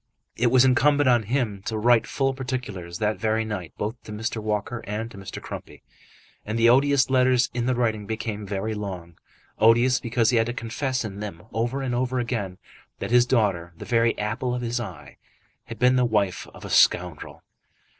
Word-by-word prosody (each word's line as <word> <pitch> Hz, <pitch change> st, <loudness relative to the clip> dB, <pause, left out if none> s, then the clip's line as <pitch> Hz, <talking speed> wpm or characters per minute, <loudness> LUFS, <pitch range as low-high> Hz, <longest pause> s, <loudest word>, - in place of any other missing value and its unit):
It 120 Hz, -, +2 dB
was 130 Hz, +1 st, +5 dB
incumbent 145 Hz, +2 st, +4 dB
on 120 Hz, -2 st, +5 dB
him 115 Hz, -7 st, -1 dB
to 110 Hz, -, -2 dB
write 120 Hz, +1 st, +3 dB
full 135 Hz, -1 st, 0 dB
particulars 120 Hz, -10 st, -5 dB
that 105 Hz, -1 st, -1 dB
very 110 Hz, +1 st, 0 dB
night 100 Hz, -7 st, -5 dB
both 110 Hz, +4 st, -4 dB
to -, -, -8 dB
Mr. 110 Hz, +1 st, -3 dB
Walker 105 Hz, +2 st, -2 dB
and 110 Hz, +3 st, -4 dB
to -, -, -12 dB
Mr. 95 Hz, -, -7 dB
Crumpy. -, -, -9 dB, 0.6 s
And 110 Hz, +2 st, -3 dB
the 115 Hz, 0 st, +5 dB
odious 135 Hz, +1 st, +4 dB
letters 125 Hz, -1 st, +3 dB
in 120 Hz, 0 st, -1 dB
the 130 Hz, -, +2 dB
writing 110 Hz, -4 st, -1 dB
became 110 Hz, -1 st, -4 dB
very 100 Hz, +2 st, -2 dB
long; 95 Hz, -5 st, -7 dB, 0.4 s
odious 120 Hz, +4 st, +5 dB
because 115 Hz, -1 st, +1 dB
he 120 Hz, -, +2 dB
had 115 Hz, 0 st, +2 dB
to 120 Hz, -, -2 dB
confess 130 Hz, +2 st, -2 dB
in 100 Hz, -2 st, -6 dB
them 100 Hz, -5 st, -7 dB
over 120 Hz, +4 st, -1 dB
and 125 Hz, -2 st, -2 dB
over 130 Hz, +1 st, -1 dB
again 115 Hz, -7 st, -2 dB, 0.4 s
that -, -, -5 dB
his 125 Hz, 0 st, +5 dB
daughter, 95 Hz, -9 st, +1 dB
the -, -, -8 dB
very 115 Hz, -1 st, +2 dB
apple 120 Hz, +4 st, -2 dB
of 125 Hz, -, -4 dB
his 120 Hz, +1 st, -1 dB
eye, 120 Hz, -, -8 dB, 0.5 s
had 115 Hz, -3 st, -8 dB
been 125 Hz, +3 st, +4 dB
the 125 Hz, -, +3 dB
wife 105 Hz, -6 st, 0 dB
of -, -, -12 dB
a -, -, -7 dB
scoundrel. -, -, +2 dB
115 Hz, 195 wpm, -25 LUFS, 105-125 Hz, 0.6 s, was